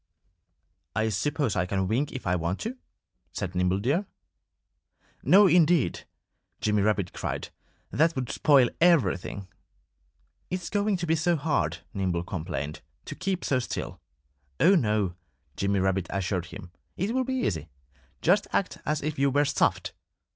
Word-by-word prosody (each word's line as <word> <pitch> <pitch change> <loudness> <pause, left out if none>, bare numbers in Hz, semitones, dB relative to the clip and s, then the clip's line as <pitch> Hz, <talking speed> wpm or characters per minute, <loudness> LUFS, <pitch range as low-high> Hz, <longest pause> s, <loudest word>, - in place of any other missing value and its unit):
"I 110 +1 +1
suppose 135 +3 -1
I 90 -1 0
can 95 0 -1
wink 130 +8 0
if 130 - -7
I 90 0 +2
want 85 +2 -2
to," 230 +4 -3 0.6
said 90 - -4
Nimble 90 +1 +1
Deer. 145 - 0 1.1
"No, 205 +2 +6
indeed!" 170 - +3 0.5
Jimmy 105 -1 +1
Rabbit 100 -3 0
cried. - - -4 0.4
"That 165 +2 +2
would 130 -3 -3
spoil 135 -5 +4 0.2
everything." 100 - 0 1.0
"It's 180 -1 -4
going 205 -1 +1
to 175 - -3
be 160 - +2
hard," 160 -2 0
Nimble 90 -4 -1
complained, 75 -5 -5 0.2
"to - - -6
keep 185 -1 -3
so 130 - +2
still." 120 - -5 0.6
"Oh, 190 - +6
no!" 105 - +1 0.4
Jimmy 100 0 0
Rabbit 95 -1 0
assured 95 -2 -2
him. 90 0 -10 0.3
"It 200 +6 -1
will 260 0 +1
be 260 +1 -2
easy. 85 - -2 0.5
Just 195 +5 +3
act 195 - -1
as 150 -1 0
if 150 -1 -3
you 140 0 +4
were 145 +2 +2
stuffed!" - - 0
125 Hz, 145 wpm, -27 LUFS, -, 1.1 s, No